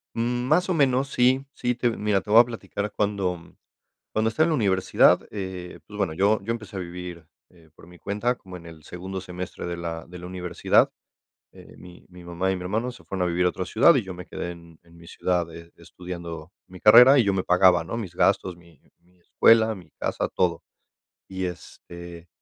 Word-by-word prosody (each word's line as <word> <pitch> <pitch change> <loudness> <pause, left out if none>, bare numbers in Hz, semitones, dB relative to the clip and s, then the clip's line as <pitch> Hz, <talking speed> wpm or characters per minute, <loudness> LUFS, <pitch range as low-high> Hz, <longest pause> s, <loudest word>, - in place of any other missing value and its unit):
Mm, 120 +2 -1
más 180 +5 +2
o - - +2
menos, 135 -2 +2
sí, 130 +2 +2
sí, 125 0 -2
te 120 0 +1
mira, 105 -3 0
te 105 - -15
voy 110 +2 +7
a - - +3
platicar 105 -3 -5
cuando 95 -5 -2 0.6
cuando 110 +1 +1
estaba 155 +8 +2
en - - 0
la - - +2
universidad, 95 -5 +3
eh, 95 -3 -7
pues 105 - -10
bueno, 95 -6 -1
yo 100 +4 +2
yo 115 - -3
empecé 110 -4 -6
a - - -3
vivir, 85 -2 -8 0.2
eh, 85 -3 -22
por 80 - -17
mi 90 0 -16
cuenta, 105 +5 -1
como 90 -4 -11
en 85 - -15
el 80 -2 -13
segundo 95 +3 -7
semestre 90 -1 -7
de 85 0 -4
la 85 -1 -5
de 90 +1 -10
la 90 - -9
universidad, 90 -1 +1 0.6
eh, - - -15
mi 90 0 -14
mi 90 -1 -14
mamá 85 +2 -2
y 95 - -1
mi 90 - -8
hermano 110 +7 -2
se - - -16
fueron 90 -2 -2
a - - -1
vivir 90 +1 +1
a 90 - +4
otra 90 - -5
ciudad 130 - +5
y 125 - +1
yo 95 - -7
me 90 0 -9
quedé 85 - -5
en 85 -2 -14
en 85 0 -20
mi 85 - -15
ciudad 85 -2 -1
e 85 0 -12
estudiando 85 -2 -9 0.2
mi 90 -1 -13
carrera 125 +6 +8
y 120 - +5
yo 100 - +2
me 95 - -1
pagaba, 90 -1 +4
¿no?, 105 +7 -5
mis 90 -7 -6
gastos, 95 -2 +1
mi 85 -4 -21 0.2
mi 90 +1 -31
escuela, 110 +5 +4
mi 90 -5 -14
casa, - - -2
todo, 85 -2 -1 0.7
y 95 -1 -4
este, 85 -1 -10
90 Hz, 215 wpm, -24 LUFS, 85-110 Hz, 0.7 s, carrera